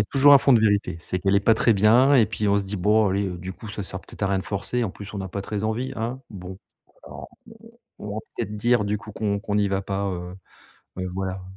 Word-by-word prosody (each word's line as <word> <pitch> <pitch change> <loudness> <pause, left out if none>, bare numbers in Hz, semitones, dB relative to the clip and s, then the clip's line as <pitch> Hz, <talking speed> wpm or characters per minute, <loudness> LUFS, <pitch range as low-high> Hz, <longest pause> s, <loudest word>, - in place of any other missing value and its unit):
a 100 - +2
toujours 140 +5 +5
un 140 - +10
fond 135 - +3
de 115 - +5
vérité, 100 -5 +1
c'est 90 +2 -3
qu'elle 95 +1 +2
est 100 - +3
pas 115 - +4
très 115 0 +3
bien 120 +8 +5
et 120 -5 +6
puis 105 -1 -2
on 100 - +3
se 100 - 0
dit: 100 +1 -4
«Bon 105 +3 +3
allez, 100 +1 0
heu, 90 - -6
du 90 +2 -7
coup 110 +3 -11
ça 105 -1 -5
sert 95 0 -6
peut-être - - -13
à 100 - +3
rien 100 - +1
de 95 - -5
forcer, 110 +4 -2
en 100 - -3
plus 100 +2 -10
on 100 - -5
n'a 95 -1 -5
pas 100 +1 -5
très 105 +1 -4
envie 125 +5 -2
hein? 120 +4 -3
Bon, 95 -2 -8 0.5
alors - - -10 0.3
on - - -16 0.3
on - - -6
va - - -1 0.2
peut-être 105 +1 -4
dire 120 0 +2
du 105 +1 -1
coup 105 - -11
qu'on 100 -2 -1
qu'on 105 0 -4
n'y 105 -1 +2
va 95 0 -1
pas», 100 +1 -2
heu, 90 0 -6 0.6
mais 95 - -4
voilà. 95 +1 -4
100 Hz, 280 wpm, -24 LUFS, 95-110 Hz, 0.6 s, un